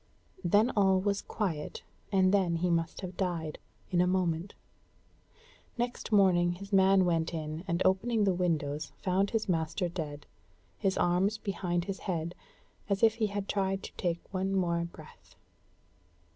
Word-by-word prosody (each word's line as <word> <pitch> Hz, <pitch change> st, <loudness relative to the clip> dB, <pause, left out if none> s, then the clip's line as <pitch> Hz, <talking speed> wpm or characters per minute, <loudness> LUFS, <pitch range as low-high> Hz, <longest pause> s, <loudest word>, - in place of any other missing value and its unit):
Then 205 Hz, +8 st, +4 dB
all 190 Hz, -2 st, +4 dB
was 200 Hz, +1 st, 0 dB
quiet, 170 Hz, -9 st, -3 dB, 0.3 s
and 190 Hz, -1 st, +4 dB
then 185 Hz, -4 st, +3 dB
he 175 Hz, +1 st, 0 dB
must 165 Hz, +2 st, -1 dB
have 185 Hz, -1 st, -6 dB
died 170 Hz, -5 st, -2 dB, 0.3 s
in 175 Hz, -1 st, +3 dB
a 180 Hz, -, +3 dB
moment. 180 Hz, 0 st, 0 dB, 1.2 s
Next 240 Hz, -1 st, -3 dB
morning 180 Hz, -4 st, +4 dB
his 195 Hz, +3 st, -10 dB
man 190 Hz, -1 st, +5 dB
went 165 Hz, -1 st, 0 dB
in, 155 Hz, +1 st, -4 dB
and 170 Hz, 0 st, 0 dB
opening 215 Hz, +4 st, +2 dB
the 195 Hz, -2 st, +3 dB
windows 155 Hz, -4 st, -1 dB
found 190 Hz, +2 st, +2 dB
his 225 Hz, 0 st, -1 dB
master 165 Hz, +1 st, 0 dB
dead, 150 Hz, -4 st, -5 dB, 0.5 s
his 195 Hz, -3 st, +1 dB
arms 180 Hz, +5 st, +2 dB
behind 180 Hz, -4 st, -2 dB
his 195 Hz, 0 st, -4 dB
head, 170 Hz, -2 st, -3 dB, 0.6 s
as 200 Hz, +2 st, 0 dB
if 225 Hz, -1 st, +6 dB
he 225 Hz, -1 st, 0 dB
had 200 Hz, -1 st, -4 dB
tried 195 Hz, -1 st, -1 dB
to -, -, -8 dB
take 170 Hz, -1 st, -2 dB
one 190 Hz, +1 st, 0 dB
more 170 Hz, -2 st, +1 dB
breath. 170 Hz, -, -14 dB
185 Hz, 155 wpm, -30 LUFS, 170-195 Hz, 1.2 s, if